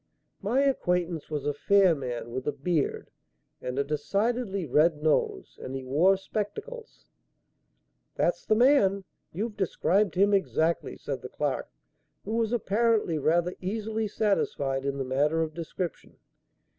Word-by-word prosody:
My 230 +7 +1
acquaintance 180 - 0
was 150 -2 -3
a 145 - +1
fair 190 +4 +4
man 125 -5 -5
with 130 +3 -4
a - - +2
beard 145 +1 -2 0.5
and 125 +1 -4
a 140 - +2
decidedly 200 - -1
red 150 +2 +2
nose 155 -1 0
and 130 - -6
he 135 - -4
wore 165 +9 +3
spectacles." 430 - -6 1.1
"That's - - 0
the 215 - +2
man. 215 -6 +4 0.3
You've 210 +5 -3
described 190 0 +1
him 200 +2 +4
exactly," 170 -4 0
said - - -5
the - - -7
clerk, - - -2 0.6
who - - -5
was 225 -1 0
apparently 220 -6 +1
rather 170 +4 +2
easily 215 +3 -2
satisfied 140 -11 0
in 140 0 -1
the 135 - -2
matter 150 +5 +1
of 155 -1 -5
description. 170 +1 -6
180 Hz, 140 wpm, -28 LUFS, 150-210 Hz, 1.1 s, fair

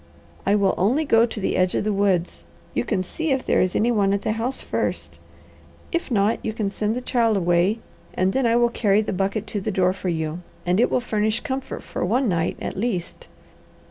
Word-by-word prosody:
"I 200 - +4
will 200 -2 +3
only 250 - +2
go 230 -3 +4
to 220 - -5
the 195 - -1
edge 185 0 +2
of - - 0
the 210 0 0
woods. 195 -3 0 0.3
You - - 0
can 190 -5 -1
see 320 - -3
if 265 -2 0
there - - +3
is 185 0 0
any 235 +3 +3
one 200 -3 +2
at 200 - -1
the - - 0
house 230 +4 -2
first. - - -3 0.7
If 340 -3 -2
not, 215 -1 +1
you 220 - -2
can 210 -3 -2
send 215 +2 -1
the 250 - -3
child 230 -4 +2
away, 175 +3 +2 0.4
and 185 +1 +1
then 265 -2 +2
I 230 - +3
will 240 0 +4
carry 210 -3 +2
the 210 - -3
bucket 195 +3 -1
to 205 -1 -4
the - - -2
door 185 -2 +2
for 190 -1 -4
you, 160 0 -2 0.2
and 180 +3 +2
it 240 - +4
will 255 - +1
furnish 215 -1 0
comfort 265 -2 -4
for - - -4
one 240 +8 +1
night, 170 -3 0
at - - -4
least." 195 -4 -3
210 Hz, 225 wpm, -23 LUFS, 185-235 Hz, 0.7 s, I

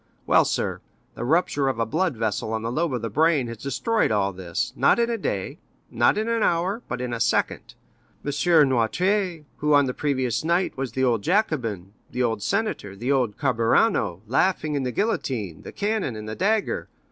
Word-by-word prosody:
Well, - - +5
sir, - - -2 0.3
the - - -6
rupture 145 0 +1
of 130 -3 0
a 115 - +1
blood 160 +2 -1
vessel 110 0 -2
on 110 0 -2
the 115 - -2
lobe 160 +4 0
of 120 - -4
the 115 - -2
brain 155 +1 +3
has 115 - -6
destroyed 215 - 0
all 100 -2 +1
this, 90 -2 -3
not - - +4
in 235 0 +1
a - - 0
day, 100 - -3 0.3
not - - +3
in 215 +1 -1
an 230 -1 0
hour, 185 +5 +1
but 125 - -4
in 125 -1 -3
a 115 - -3
second. 115 - 0 0.5
M. 145 - -1 0.4
Noirtier, 175 - 0
who, 150 0 +2
on 145 -1 +5
the 125 - -2
previous 130 -5 -1
night, 170 +3 +1
was 130 -3 -4
the 130 - 0
old 120 -4 +2
Jacobin, 120 - -1 0.2
the 125 - -1
old 110 -3 0
senator, 200 - -2
the 120 +7 -2
old 125 -7 +1
Carbonaro, 115 - +2
laughing 155 - +1
at 140 - -1
the 125 - -2
guillotine, 120 - -2
the - - -9
cannon, 205 - -1
and 110 0 -7
the 110 - -4
dagger—M. 210 +3 0
130 Hz, 195 wpm, -24 LUFS, 115-175 Hz, 0.5 s, Well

